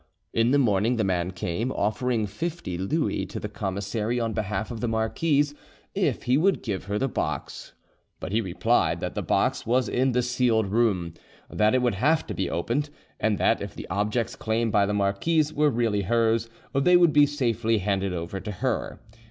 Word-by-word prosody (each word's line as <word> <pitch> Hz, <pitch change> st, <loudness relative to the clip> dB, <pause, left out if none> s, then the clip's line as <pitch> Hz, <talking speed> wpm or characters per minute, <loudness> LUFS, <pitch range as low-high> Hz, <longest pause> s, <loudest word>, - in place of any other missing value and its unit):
In 115 Hz, +1 st, +3 dB
the 140 Hz, -, +4 dB
morning 115 Hz, -2 st, +2 dB
the 110 Hz, -, 0 dB
man 90 Hz, -2 st, 0 dB
came, 95 Hz, +6 st, -3 dB
offering 110 Hz, +2 st, 0 dB
fifty 150 Hz, -, -4 dB
Louis 95 Hz, -, -1 dB
to -, -, -6 dB
the -, -, -4 dB
commissary 105 Hz, +3 st, -2 dB
on 115 Hz, -1 st, -1 dB
behalf 105 Hz, +2 st, -3 dB
of 115 Hz, -, -5 dB
the 120 Hz, -, -1 dB
marquise, 145 Hz, +7 st, +1 dB, 0.4 s
if -, -, 0 dB
he 125 Hz, +3 st, +2 dB
would 190 Hz, +2 st, +2 dB
give 100 Hz, -5 st, -3 dB
her 100 Hz, +1 st, -2 dB
the 135 Hz, -, 0 dB
box. -, -, -4 dB, 0.5 s
But -, -, -6 dB
he 110 Hz, +2 st, +2 dB
replied 95 Hz, -5 st, +1 dB
that -, -, -3 dB
the -, -, -2 dB
box -, -, 0 dB
was 125 Hz, +1 st, +2 dB
in 130 Hz, +1 st, +1 dB
the 125 Hz, +1 st, +2 dB
sealed 120 Hz, -3 st, +2 dB
room, 95 Hz, -5 st, +1 dB, 0.4 s
that 105 Hz, +3 st, +2 dB
it 130 Hz, -, +2 dB
would 120 Hz, -, +2 dB
have 145 Hz, +11 st, +2 dB
to -, -, -5 dB
be 95 Hz, -, -2 dB
opened, 120 Hz, -, -1 dB, 0.3 s
and 110 Hz, -2 st, +1 dB
that -, -, +2 dB
if -, -, -6 dB
the -, -, -8 dB
objects 105 Hz, +4 st, -1 dB
claimed 115 Hz, 0 st, -1 dB
by 100 Hz, -1 st, +3 dB
the 105 Hz, -, -1 dB
marquise 145 Hz, +11 st, +1 dB
were 150 Hz, 0 st, +3 dB
really 115 Hz, -5 st, 0 dB
hers, 115 Hz, +2 st, +1 dB, 0.2 s
they 175 Hz, +7 st, +5 dB
would 175 Hz, -3 st, +4 dB
be 145 Hz, -1 st, +6 dB
safely 115 Hz, -5 st, 0 dB
handed 100 Hz, -1 st, -1 dB
over 90 Hz, +2 st, -4 dB
to 105 Hz, -, -6 dB
her. 90 Hz, -, -2 dB
115 Hz, 195 wpm, -26 LUFS, 100-125 Hz, 0.5 s, be